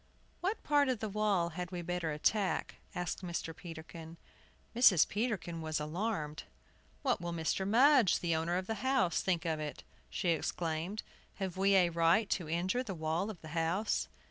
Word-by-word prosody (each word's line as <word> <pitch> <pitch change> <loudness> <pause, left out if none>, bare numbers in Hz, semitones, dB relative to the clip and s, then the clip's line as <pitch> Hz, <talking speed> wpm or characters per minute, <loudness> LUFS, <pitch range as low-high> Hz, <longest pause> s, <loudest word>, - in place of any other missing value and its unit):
"What 390 +5 -2
part 290 -2 +3
of 255 - +1
the 220 - -3
wall 200 -4 +1
had 175 +1 -5
we 175 -1 -5
better 175 -2 -2
attack?" 190 +7 0 0.2
asked 175 0 -3
Mr. 170 -2 -4
Peterkin. 165 0 -9 0.6
Mrs. 215 -9 +6
Peterkin 190 -7 -2
was 155 -1 -2
alarmed. 155 -1 -3 0.6
"What 255 -9 +1
will 170 0 -3
Mr. 170 +3 -1
Mudge, 250 - +5
the 170 -2 0
owner 165 +2 0
of 185 - -2
the 220 0 -4
house, 260 -11 +2
think 175 -3 0
of 160 -2 0
it?" 150 -1 -5 0.3
she 180 - -1
exclaimed. 165 +4 -1 0.3
"Have 190 -3 -4
we 195 +1 +3
a 180 -2 +5
right 170 +6 +3
to 170 -5 -1
injure 180 +9 0
the 210 -7 -5
wall 160 +5 -1
of 205 -6 -8
the 155 - -9
house?" 165 +6 0
175 Hz, 170 wpm, -33 LUFS, 165-210 Hz, 0.6 s, Mrs